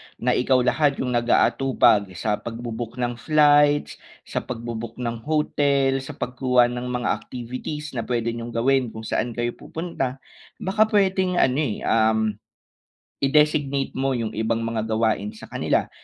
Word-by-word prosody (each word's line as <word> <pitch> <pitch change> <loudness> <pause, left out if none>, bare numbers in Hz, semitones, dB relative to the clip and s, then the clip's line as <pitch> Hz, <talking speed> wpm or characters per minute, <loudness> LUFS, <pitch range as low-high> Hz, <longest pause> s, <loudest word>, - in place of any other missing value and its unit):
na 125 +1 0
ikaw 130 +1 +3
lahat 145 +2 +2
yung 125 - -2
nagaatupag 120 -2 +3
sa 105 +4 -1
pagbu-book 115 0 -6
ng 120 -1 -3
flights, 145 +2 +3 0.2
sa - - -3
pagbu-book 115 -1 -6
ng 120 -2 -4
hotel, 140 -3 +2
sa 130 - -8
pagkuha 125 -1 +2
ng 125 0 -4
mga 125 -1 -2
activities 130 +5 -6
na 125 - -4
pwede 120 -1 0
niyong 115 0 -7
gawin 130 +1 +2
kung 110 0 -8
saan 115 +1 -2
kayo 120 0 -1
pupunta. 135 -6 -4 0.3
Baka 215 +3 +1
pwedeng 190 -3 +2
ano, 130 -5 +2
eh, 130 -9 -2
um, 110 0 +3 1.0
i-designate 140 -1 +2
mo 135 0 +1
yung 115 -3 -2
ibang 115 +1 0
mga 115 -1 -2
gawain 110 -1 0
sa 110 - -12
kanila. - - 0
125 Hz, 145 wpm, -23 LUFS, 115-140 Hz, 1.0 s, ikaw